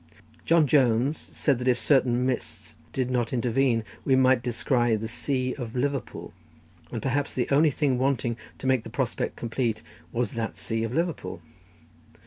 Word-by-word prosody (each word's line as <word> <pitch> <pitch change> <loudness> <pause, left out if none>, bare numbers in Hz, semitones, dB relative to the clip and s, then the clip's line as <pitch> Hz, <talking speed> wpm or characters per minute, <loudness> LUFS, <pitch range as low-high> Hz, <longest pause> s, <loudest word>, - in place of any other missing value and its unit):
John 165 -2 +5
Jones 130 0 +3
said 140 -5 -1
that 125 - -3
if 125 -1 +4
certain 125 -3 +3
mists 130 -1 -3 0.2
did 130 -1 -1
not 120 -2 0
intervene 125 -1 +2 0.2
we 135 - +3
might 130 -1 +4
descry 120 -1 +1
"the 110 +1 -3
sea 130 +2 -1
of 120 -4 -6
Liverpool;" 135 -2 -3 0.6
and - - -4
perhaps 140 +2 -1
the 125 - 0
only 150 +3 +5
thing 140 -3 0
wanting 130 -3 +1 0.2
to - - -9
make 130 -3 +2
the - - -8
prospect 125 +1 -2
complete 115 -1 -2 0.3
was 120 -2 -1
that 115 -1 -4
sea 115 0 -2
of 115 - -2
Liverpool. 160 - -2
125 Hz, 160 wpm, -26 LUFS, 115-135 Hz, 0.6 s, John